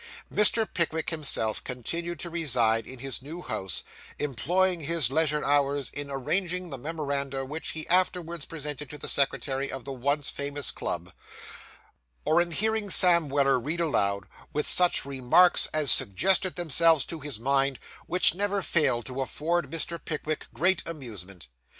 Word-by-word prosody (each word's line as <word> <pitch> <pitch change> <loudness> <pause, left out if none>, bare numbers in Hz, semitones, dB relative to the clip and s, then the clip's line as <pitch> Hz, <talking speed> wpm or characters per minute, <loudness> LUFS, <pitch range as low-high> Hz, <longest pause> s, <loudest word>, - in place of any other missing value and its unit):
Mr. 215 +1 +6
Pickwick 160 -1 -1
himself 140 -9 0
continued 170 +8 -5
to 170 - -5
reside 120 -9 +1
in 130 - -8
his 135 +1 -3
new 160 +6 -9
house, 95 -1 -4 0.3
employing 175 +7 0
his 155 -4 0
leisure 150 0 0
hours 140 -1 +1
in 145 0 -5
arranging 180 +6 -1
the 135 - -5
memoranda 140 -2 -3
which 150 +4 -5
he 160 -1 -4
afterwards 175 -3 0
presented 150 -3 -6
to 150 - -8
the - - -5
secretary 135 0 -1
of 135 -2 -7
the 135 - -5
once 140 +3 -1
famous 140 -1 -3
club, 85 +1 -5 1.1
or 160 +3 +3
in 175 - -2
hearing 215 +4 -1
Sam 170 -5 +6
Weller 140 -1 +2
read 155 +8 -4
aloud, 100 -12 0 0.3
with 150 - -2
such 180 -5 +3
remarks 140 +6 +4
as 155 -4 +3
suggested 185 - +3
themselves 165 -3 +3
to 165 - -7
his 145 -6 -5
mind, 135 +1 +1 0.3
which 180 +2 +4
never 200 +1 -2
failed 135 -10 +1
to 130 +1 -4
afford 165 +6 -2
Mr. 165 +1 -3
Pickwick 155 0 -4
great 175 +10 +3
amusement. 105 - -8
150 Hz, 150 wpm, -26 LUFS, 135-170 Hz, 1.1 s, Mr